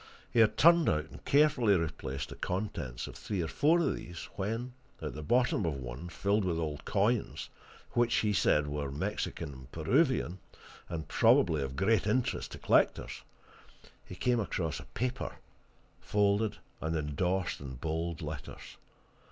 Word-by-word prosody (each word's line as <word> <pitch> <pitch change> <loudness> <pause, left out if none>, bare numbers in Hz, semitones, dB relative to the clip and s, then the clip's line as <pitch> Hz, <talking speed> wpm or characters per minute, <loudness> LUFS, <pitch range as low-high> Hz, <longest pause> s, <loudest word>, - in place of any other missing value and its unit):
He 120 - +2
had 110 -1 +5
turned 170 0 +6
out, 75 0 -1
and - - -12
carefully 140 -8 +4
replaced, 75 -6 -3
the - - -8
contents 90 - -3
of - - -9
three 100 - -4
or - - -2
four 155 - +3
of 170 - +1
these, 85 -1 -8
when, 115 +5 -3 0.3
at 75 - -5
the 75 - -6
bottom 120 +5 +2
of 80 -4 0
one, 65 +5 -6
filled 100 +4 +1
with 90 -3 0
old 75 -3 -3
coins, 105 +3 0 0.4
which, 120 -1 +2
he 105 -1 +2
said, 75 -6 +3
were 75 -1 -3
Mexican 70 +2 -3
and 65 0 -13
Peruvian, 95 - +1 0.5
and 80 -3 -4
probably 80 -4 +4
of 65 0 -4
great 105 +3 +2
interest 120 +4 0
to - - -6
collectors, - - +2 0.8
he 90 - -10
came 120 +6 +1
across 85 -7 -2
a - - -10
paper, 125 +3 -3 0.6
folded 105 +1 +1 0.2
and 80 +1 -1
endorsed 90 +5 -1
in 65 -2 -7
bold 80 +4 -3
letters. - - -7
90 Hz, 155 wpm, -31 LUFS, 75-110 Hz, 0.8 s, turned